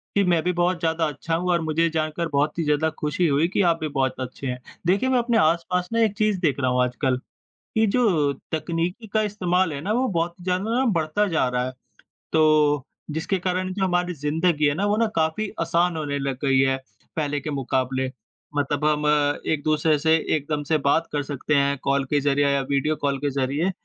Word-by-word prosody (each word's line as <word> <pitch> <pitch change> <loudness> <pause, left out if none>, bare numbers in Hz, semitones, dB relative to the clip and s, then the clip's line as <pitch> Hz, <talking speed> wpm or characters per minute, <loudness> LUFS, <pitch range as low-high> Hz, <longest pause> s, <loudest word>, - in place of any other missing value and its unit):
कि 200 - +4
मैं 170 -3 +2
भी 180 - 0
बहुत 175 0 +2
ज़्यादा 165 0 +1
अच्छा 150 +3 -3
हूँ 180 +2 -1
और 170 - +2
मुझे 160 +1 +1
जानकर 160 +1 -2
बहुत 145 +2 0
ही 165 - 0
ज़्यादा 150 +1 +1
ख़ुशी 150 +4 0
हुई 150 +2 +2
कि 200 - +1
आप 165 - -1
भी 155 - -2
बहुत 130 -1 0
अच्छे 130 +2 -6
हैं। 125 -1 -2 0.3
देखिए 195 +8 +2
मैं 260 -1 +3
अपने 235 -1 +1
आस-पास 170 +3 +1
ना 230 - +2
एक 210 -2 0
चीज़ 215 -3 +2
देख 145 -5 +1
रहा 130 -2 +1
हूँ 125 0 +2
आजकल, 125 +1 0 0.4
कि 220 0 -1
जो 190 - +2 0.2
तकनीकी 170 +6 -2
का 215 - +3
इस्तेमाल 185 -5 0
है 140 - -5
ना 195 +7 -2
वो 255 +3 +1
बहुत 170 -4 -1
ही - - -12
ज़्यादा 185 +4 -1
ना 265 - +2
बढ़ता 165 +4 +1
जा 160 -7 +1
रहा 125 0 -1
है। 130 - -4 0.6
तो 155 -3 +3 0.3
जिसके 160 +5 -1
कारण 185 +1 -2
जो 190 0 -1
हमारी 180 -1 0
ज़िंदगी 155 +2 0
है 145 - +2
ना 190 +6 -1
वो 205 +1 +2
ना 230 +1 +2
काफ़ी 160 +6 0
आसान 170 +1 +1
होने 145 -2 -2
लग 135 -2 -3
गई 135 -1 +3
है, 135 0 +3 0.4
पहले 145 -2 -1
के 150 - -5
मुकाबले। 130 -1 -1 0.5
मतलब 145 +1 0
हम 150 0 +2 0.5
एक-दूसरे 155 0 +1
से 160 +2 +3 0.2
एकदम 150 0 -3
से 160 - +3
बात 160 +4 +2
कर 145 -1 0
सकते 145 +1 -2
हैं 140 0 +2
कॉल 140 0 +1
के 145 - +3
ज़रिए 145 0 +2
या 140 0 +2
वीडियो 150 +2 +1
कॉल 140 -1 0
के 145 +1 -1
ज़रिए। 140 +6 0
160 Hz, 215 wpm, -24 LUFS, 145-180 Hz, 0.6 s, कि